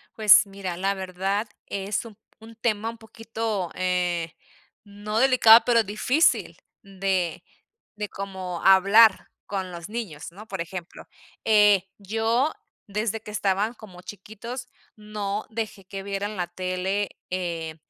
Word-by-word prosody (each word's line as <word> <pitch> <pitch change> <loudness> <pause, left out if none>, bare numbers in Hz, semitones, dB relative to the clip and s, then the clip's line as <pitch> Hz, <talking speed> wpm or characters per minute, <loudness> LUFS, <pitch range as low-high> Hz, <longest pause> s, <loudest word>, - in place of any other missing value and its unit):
Pues, 215 -2 +7
mira, 195 -3 -6
la 195 +2 0
verdad 195 +3 -2 0.2
es 200 +3 -3
un 220 -3 -12 0.2
un 225 +1 -13
tema 225 -1 -1
un 230 - -8
poquito, 220 -4 -4
eh, 180 -2 -1 0.5
no 205 +1 -5
delicado, 240 -3 +7
pero 235 -2 +4
difícil 250 - +1 0.3
de 190 -3 -1 0.5
de 210 -1 -4
como 190 -3 -6
hablar 195 +3 +6 0.2
con 190 -2 -4
los 170 -1 -8
niños, 205 -10 -6
¿no?, 210 +5 -12
por 195 -2 -6
ejemplo, 170 +1 -8 0.4
eh, 210 -3 +5
yo 225 +8 0 0.4
desde 215 +2 -2
que 210 - -9
estaban 205 +2 0
como 185 -6 -13
chiquitos, 220 +6 -8 0.3
no 210 -1 -4
dejé 215 -4 -5
que 195 0 -7
vieran 200 +1 -3
la 175 -1 -1
tele, 185 +3 -2 0.2
eh, 170 -3 -3
200 Hz, 130 wpm, -25 LUFS, 185-220 Hz, 0.5 s, Pues